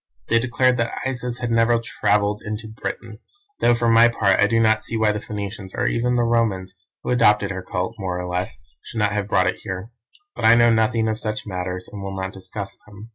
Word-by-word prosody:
They 115 - +4
declared 125 +1 +2
that 120 -1 -2
Isis 125 -2 -2
had 120 -1 -2
never 115 +1 +4
travelled 105 -2 0
into 105 +2 -5
Britain, 110 0 -6 0.4
though 120 - +4
for 120 0 0
my 115 +1 +7
part 105 -5 +2
I 105 - +5
do 115 +1 +2
not 110 -1 +3
see 115 - -2
why 110 -1 +3
the 105 - -3
Phoenicians, 100 -2 -6
or - - 0
even 125 +1 +1
the 120 - +2
Romans, 110 -6 0 0.3
who - - -2
adopted 105 -4 +3
her 95 0 -4
cult, 90 +3 -3
more 90 -2 -3
or 90 - -4
less, 90 -8 -3 0.2
should - - -9
not 105 -2 +2
have 105 -1 -1
brought 95 -2 +3
it 95 - -1
here. 95 +4 -6 0.4
But - - -3
I 115 +1 +8
know 120 -1 +5
nothing 110 0 +2
of 110 0 -1
such 110 0 -3
matters 90 -2 -4
and 105 - -9
will 95 -1 -5
not 95 0 -4
discuss 95 +1 -7
them. 105 +2 -12
110 Hz, 225 wpm, -22 LUFS, 95-115 Hz, 0.4 s, I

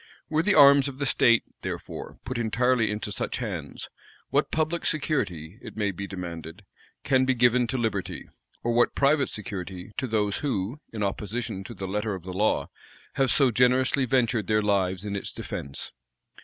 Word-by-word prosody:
Were 155 0 +2
the 205 +3 +3
arms 140 -1 +8
of 135 -2 -6
the 140 - -1
state, 120 -2 +4 0.2
therefore, - - -6
put 125 0 -3
entirely 120 +1 +2
into 105 0 -3
such - - -2
hands, 90 - -5 0.4
what - - +2
public 160 +2 0
security, 100 - -1
it - - -10
may 105 -2 +1
be 100 +2 -6
demanded, 85 0 -7 0.4
can 130 -2 +3
be 130 0 +2
given 120 0 +4
to 130 - -2
liberty, 110 -5 -2 0.4
or 120 - +1
what 120 +1 +3
private 140 +1 +3
security 95 -2 -6
to 130 - -1
those 105 -3 0
who, 125 -1 -2
in 110 -2 -3
opposition 100 0 -3
to 120 - -8
the 95 - -5
letter 105 +1 -1
of 90 - -9
the 90 0 -6
law, 105 +4 +1 0.4
have 135 -1 +2
so 135 -1 +4
generously 130 +2 +3
ventured 120 -4 +1
their 105 -1 +2
lives 95 -2 +1
in 100 -1 -3
its 100 - -4
defence? 70 0 -6
110 Hz, 175 wpm, -26 LUFS, 100-130 Hz, 0.4 s, arms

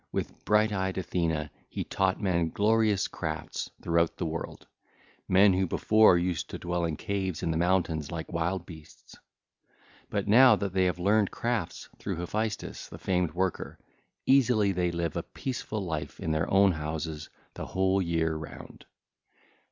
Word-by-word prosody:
With - - -4
bright 105 +1 +3
eyed 95 -1 -1
Athene 80 -4 -1 0.2
he - - -3
taught 95 -1 0
men 85 -5 +1
glorious 105 +1 +2
gifts 80 -3 -5
throughout 85 0 +1
the - - -2
world,—men 95 +4 -1
who 95 +1 +1
before 110 0 +5
used 90 -1 -2
to - - -5
dwell 85 0 -2
in 80 -2 -2
caves 95 -5 -3
in 80 - 0
the 80 - -1
mountains 85 -4 +1
like 80 0 -6
wild 85 +2 -1
beasts. 80 -3 -14 0.9
But - - -2
now 125 +5 +7
that 100 -2 -3
they 95 -1 +3
have 90 -1 0
learned 100 +3 +2
crafts 115 -8 -3
through - - -3
Hephaestus 105 +6 -3
the - - -10
famed 90 -4 0
worker, 95 0 -2 0.5
easily 125 -7 +4
they 90 -1 0
live 85 -2 -2
a - - -1
peaceful 120 -5 -5
life 80 -3 -4
in 80 - -2
their 80 +1 0
own 100 0 +5
houses 80 -1 -4 0.2
the - - -6
whole 95 +1 +1
year 80 -2 0
round. 80 -1 -9
90 Hz, 155 wpm, -28 LUFS, 80-100 Hz, 0.9 s, now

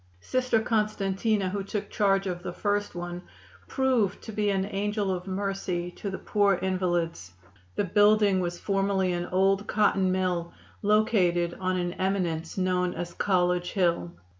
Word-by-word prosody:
Sister 250 - +1
Constantina, 215 -2 0
who 200 +1 -3
took 205 +1 -4
charge 195 -2 +2
of 180 -2 -3
the - - -5
first 205 -2 -1
one, 175 0 -5 0.5
proved 250 -8 +1
to 220 - -7
be 210 -1 0
an 195 -1 +1
angel 205 0 -1
of 180 0 -4
mercy 190 -2 -2
to 200 - -6
the 190 - -4
poor 205 -2 +2
invalids. 175 - -1 0.4
The - - +1
building 205 +1 +4
was 175 -1 -3
formerly 195 -2 +1
an 175 0 -2
old 195 +2 +2
cotton 195 -3 +2
mill, 180 -2 -1 0.3
located 190 -5 +2
on 185 0 0
an 175 -1 -2
eminence 180 -4 -2
known 180 -1 0
as 175 0 -5
College 180 -2 +1
Hill. 170 - +1
190 Hz, 150 wpm, -27 LUFS, 180-205 Hz, 0.5 s, building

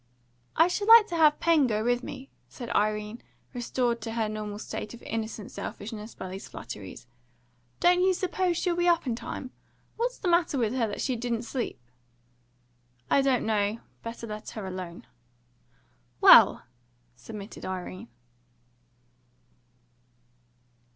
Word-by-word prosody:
"I 330 - +6
should 405 +3 -2
have 455 +1 +12
liked 440 -2 0
to 345 - -3
have 305 -2 +5
Pen 320 -5 +4
go 215 -2 0
with 245 +1 +1
me," 270 +1 -9 0.2
said 240 -3 -7
Irene, 210 +2 0 0.3
restored 240 -1 -1
to 225 +1 -5
her 225 -2 0
normal 210 -1 -5
state 210 +1 -6
of 240 - -16
innocent 220 -2 -5
selfishness 215 +1 -7
by 185 - -7
these 190 +1 -7
flatteries. 105 -3 -9 0.7
"Don't 355 +1 +4
you 375 0 +3
suppose 365 -1 0
she'll 350 -1 0
be 350 0 +1
up 340 -2 +3
in 240 -3 -1
time? 255 +2 -6 0.5
What's 485 +2 -1
the - - -4
matter 340 -4 +2
with 230 -2 0
her 245 -3 +1
that 205 - -5
she 260 - 0
didn't 235 0 -2
sleep?" 240 +1 -4 1.3
"I 275 - +5
don't 270 -2 +2
know. 210 0 +1 0.2
Better 230 0 -7
let 215 -1 -7
her 215 -3 -6
alone." 185 -2 -7 1.1
"Well," - - +8 0.5
submitted 200 - -9
Irene. 185 +3 -6
235 Hz, 145 wpm, -28 LUFS, 210-305 Hz, 1.3 s, have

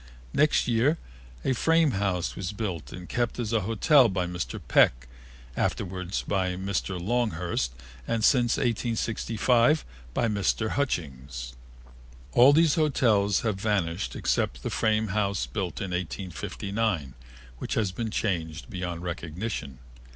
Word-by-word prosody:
Next 150 -3 +3
year 125 +7 +3 0.5
a 130 - +3
frame 160 +3 +3
house 95 -4 -1
was 95 +1 -4
built 95 -7 -4
and 90 -1 -8
kept 120 -1 -1
as 115 -2 -2
a 115 - +4
hotel 115 +5 +4
by 95 -2 -1
Mr. 90 -1 -4
Peck, - - +4 0.5
afterward 90 -1 -2
by 95 -2 0
Mr. 95 -1 -2
Longhurst 90 - -1 0.4
and 115 -1 0
since 120 -3 +4
1864 115 +2 +2 0.4
by 120 - +2
Mr. 105 +1 0
Hutchings. 65 - -3 0.8
All 125 - +7
these 160 0 +5
hotels 115 - +2
have 105 -4 -2
vanished 100 -4 -1
except - - -1
the - - -2
frame 110 0 +1
house 100 0 0
built 95 -6 -4
in 95 -3 -4
1859, 95 - -3 0.5
which - - -3
has 105 -4 +1
been 110 +4 -3
changed 85 -4 -2
beyond 90 -3 -4
recognition. 85 - -4
100 Hz, 130 wpm, -27 LUFS, 90-115 Hz, 0.8 s, All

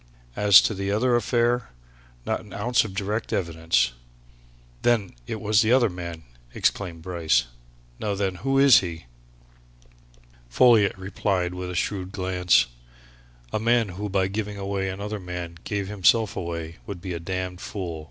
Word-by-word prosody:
As 100 -1 +7
to - - 0
the 100 0 -3
other 120 +5 +2
affair 120 +1 +1 0.6
not - - -1
an 105 - -13
ounce 120 +4 +2
of 100 -4 -7
direct 105 +3 -2
evidence!" 80 -8 +1 0.9
"Then 115 -6 +1
it 110 - -4
was 105 -1 +3
the 110 - +2
other 125 -5 +4
man!" 85 -2 -7 0.3
exclaimed 85 -5 -1
Bryce. 80 -9 +1 0.6
"Now 105 -2 -2
then, 95 -1 -1
who 135 +6 0
is 135 -2 +8
he?" 85 -5 -6 1.4
Folliot 110 - +4
replied 95 -1 -1
with 90 0 -5
a 90 - -5
shrewd 95 0 -2
glance. 90 -6 +2 0.9
"A - - +1
man 115 -1 +2
who 100 +3 -5
by 95 -1 +1
giving 105 +1 -4
away 100 -1 -2
another 100 +3 -5
man 90 -2 -7
gave 100 -2 -2
himself 105 +2 +2
away 85 -2 -5
would 100 -3 -6
be 90 0 -5
a 85 - -4
damned 90 +1 -4
fool!" 90 -6 -5
95 Hz, 150 wpm, -25 LUFS, 90-105 Hz, 1.4 s, is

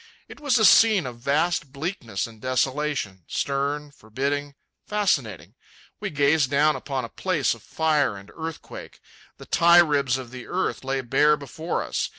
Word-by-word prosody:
It - - -12
was 285 -4 +2
a 220 - +4
scene 215 -5 +6
of 120 -2 -7
vast 150 +3 0
bleakness 140 - -4
and 110 -2 -13
desolation, 130 - -1
stern, 140 +1 -2
forbidding, 140 +4 -4 0.3
fascinating. 125 - -1 0.5
We 210 - -3
gazed 145 -2 +2
down 150 +2 +3
upon 135 -4 -4
a - - -10
place 165 -5 0
of 115 - -13
fire 150 -6 0
and 100 +1 -13
earthquake. 160 -1 -8 0.4
The - - -12
tie 170 +1 +5
ribs 140 -6 +3
of 130 -2 -9
earth 130 +9 -3
lay 135 0 -1
bare 150 +5 +3
before 155 +4 -4
us. - - -2
140 Hz, 155 wpm, -24 LUFS, 130-160 Hz, 0.5 s, scene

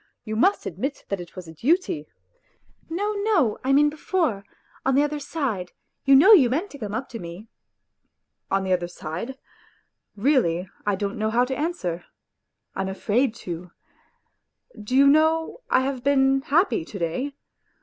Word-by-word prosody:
You 215 -1 -4
must 380 - +2
admit 260 - -4
that 200 -2 -2
it 175 - -12
was 185 -3 -8
a 160 - -10
duty... 250 - 0 0.3
." - - -41
" - - -36
No, 405 +6 -1
no; 405 - +1
I 265 - +1
mean 290 +2 +5
before, 300 - -1 0.4
on 265 0 +2
the 285 - +5
other 295 0 -2
side 240 - -3 0.3
you 275 0 +7
know 380 +11 +8
you 275 - +7
meant 325 - -1
to 285 - -11
come 210 -3 -4
up 255 - -3
to 230 - -7
me." 175 +5 -9 1.0
%i - - +1
On 195 - -2
the 190 -1 +1
other 175 -1 0
side? 175 +9 -6 0.8
Really 200 - +2 0.2
I 205 - +2
don't 200 +1 -3
know 215 0 +1
how 240 +3 +3
to 265 +1 -3
answer; 290 - -3 0.7
I - - -3
am 190 - -2
afraid 220 +5 0
to.... 175 0 -6 1.1
Do 210 +5 -3
you 275 +1 +7
know 315 - +3
I - - +4
have 260 -2 -3
been 270 -1 +3
happy 340 +6 +2
to 215 - -9
day? 225 - -2
260 Hz, 180 wpm, -24 LUFS, 195-295 Hz, 1.1 s, know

